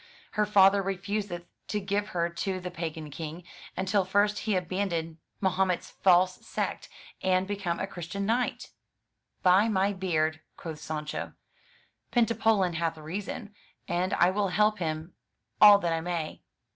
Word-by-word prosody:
Her 210 0 +1
father 200 -1 +6
refuseth 195 -1 -3 0.2
to 210 - -1
give 200 +1 -1
her 170 -3 0
to 185 +2 -3
the 180 0 -6
pagan 160 -3 -5
King, 160 +3 -6 0.3
until 190 +2 +2
first 205 +3 +2
he 205 - +3
abandon 175 -3 -2 0.2
Mahomet's 190 -1 +1
false 185 0 +3
sect, - - -3 0.3
and 185 0 +2
become 195 -4 -2
a - - -1
Christian 195 +1 -5
Knight/' 240 +4 -1 0.7
"By 190 +4 +5
my 200 -1 +2
beard," 160 -4 0 0.2
quoth 160 -3 -7
Sancho, 150 0 -4 0.8
"Pentapolin 225 -6 +2
hath 165 -1 -1
reason, 195 +6 -6 0.3
and 180 +3 0
I 175 +2 +4
will 200 +1 +1
help 210 +2 +2
him 160 0 -3 0.5
all 205 -1 +10
that 170 -4 -1
I 165 - -1
may." 170 -2 -3
185 Hz, 140 wpm, -28 LUFS, 170-200 Hz, 0.8 s, all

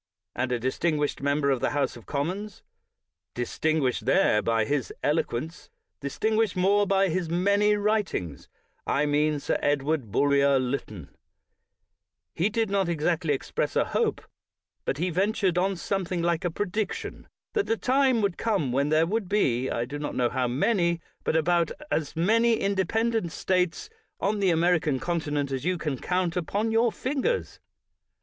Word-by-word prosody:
' - - -64
' - - -60
And 125 0 -1
a 125 - +1
distinguished 145 +5 -1
member 140 0 +1
of 130 - +1
the - - 0
House 140 -2 0
of 120 - -13
Commons 180 +8 -3 0.3
— 90 +2 -61
distinguished 130 -1 -1
there 135 - +4
by 115 -1 +1
his 140 -1 -1
eloquence, 155 +1 -2 0.3
distinguished 215 +9 0
more 200 +3 +3
bj 195 0 +3
his 175 -1 -1
many 200 +4 +3
writings 205 - -1 0.2
— - - -33
I 145 - +2
mean 150 0 +1
Sir - - -1
Edward 145 -4 0
Bulwer 140 +2 +3
Lytton 125 - -4 0.6
— - - -56
he 195 - +3
did 225 -2 -1
not 195 -3 +1
exactly 165 -1 0
express - - -3
a - - +3
hope, - - -1 0.6
but 135 - -1
he 175 +4 -1
ventured 190 0 +1
on 195 +2 +1
something 180 -1 -2
like 170 -1 0
a 175 - +1
prediction, 205 +4 -4 0.3
that 415 -2 0
the 225 - +1
time 260 -3 +2
would 195 -4 -1
come 195 - 0
when 140 +3 +1
there 155 +1 +4
would 200 +1 -2
be, 130 - +1
I 120 - -1
do 145 +4 -6
not 145 - -4
know 120 -1 +2
how 130 -1 0
many, 170 - +1 0.2
but - - 0
about 170 +1 +2 0.2
as 155 -3 -1
many 225 +8 +3
in 200 -2 0
dependent 220 0 0
States 180 - 0 0.3
on 210 0 0
the 195 -2 +3
American 165 -4 +2
continent 150 -4 -2
as 135 -1 -3
you 180 +2 0
can 150 -6 -3
count 180 -2 -1
upon 200 +6 -1
your 225 +1 +3
fingers. 285 - -2
170 Hz, 170 wpm, -26 LUFS, 140-200 Hz, 0.6 s, there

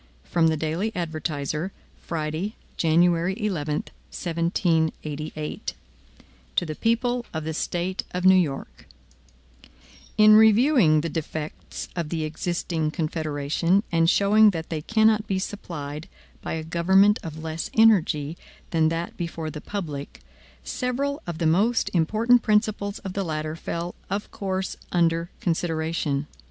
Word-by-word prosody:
From 165 -2 +2
the 160 -1 +1
Daily 160 +8 -1
Advertiser. 155 0 -3 0.3
Friday, 165 +6 -3 0.2
January 170 +2 +3
11, 165 -8 -1 0.4
1788. 160 -3 -1
MADISON 155 -1 -5 0.8
To - - +2
the 155 - -4
People 240 +6 0
of 160 -1 -4
the 160 +1 -3
State 175 +3 -2
of 180 0 -3
New 190 - +8
York: 150 -7 -1 1.3
IN 215 0 +8
REVIEWING 220 - +5
the 165 - -3
defects 155 -1 -5
of 170 -3 -2
the 160 -1 -2
existing 160 0 -2
Confederation, 155 +4 0
and 165 -1 +3
showing 210 +3 +5
that 165 -4 -4
they 160 -2 -3
cannot 220 +3 +3
be 195 - 0
supplied 155 -6 -5 0.3
by - - -4
a 160 -1 -3
government 190 +5 +4
of 160 -1 -7
less 160 0 -4
energy 170 -8 +3 0.3
than 160 -2 +3
that 165 +1 -3
before 165 -2 -4
the 150 - -7
public, 150 - -6 0.4
several 275 - -2
of 170 -2 -4
the 165 - -1
most 205 +9 +2
important 220 +8 +3
principles 210 -2 +1
of 190 - -7
the 195 - -1
latter 155 -2 -3
fell 170 +1 -4 0.2
of 200 +2 -3
course 190 -1 -3 0.2
under 170 -1 +2
consideration. 160 -4 -1
170 Hz, 130 wpm, -25 LUFS, 155-200 Hz, 1.3 s, New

